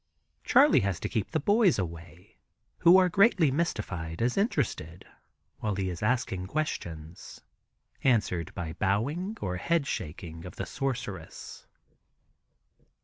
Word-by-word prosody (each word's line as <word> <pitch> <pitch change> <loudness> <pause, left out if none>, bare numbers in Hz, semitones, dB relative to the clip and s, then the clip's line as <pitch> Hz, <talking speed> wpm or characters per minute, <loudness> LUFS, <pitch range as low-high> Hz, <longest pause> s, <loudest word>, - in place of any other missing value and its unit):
Charley 280 - +6
has 100 -5 -1
to - - -1
keep 110 -5 -2
the 160 - 0
people 205 +10 +2 0.2
away, 85 0 -7 0.4
who 175 +1 +7
are 185 -1 +5
greatly 180 - +4
mystified 95 - -2
as 120 +2 +1
interested, 110 - -1 0.5
while 105 -2 -1
he 95 -1 -1
is 85 - -7
asking 105 -5 0
questions, 85 - -5 0.6
answered 105 - +1
by 80 -2 -4
bowing 145 - -1
or 90 -1 -2
head 165 - +1
shaking 80 - -5
of 90 - -9
the - - -4
sorceress. 125 -8 -5
105 Hz, 125 wpm, -28 LUFS, -, 0.6 s, who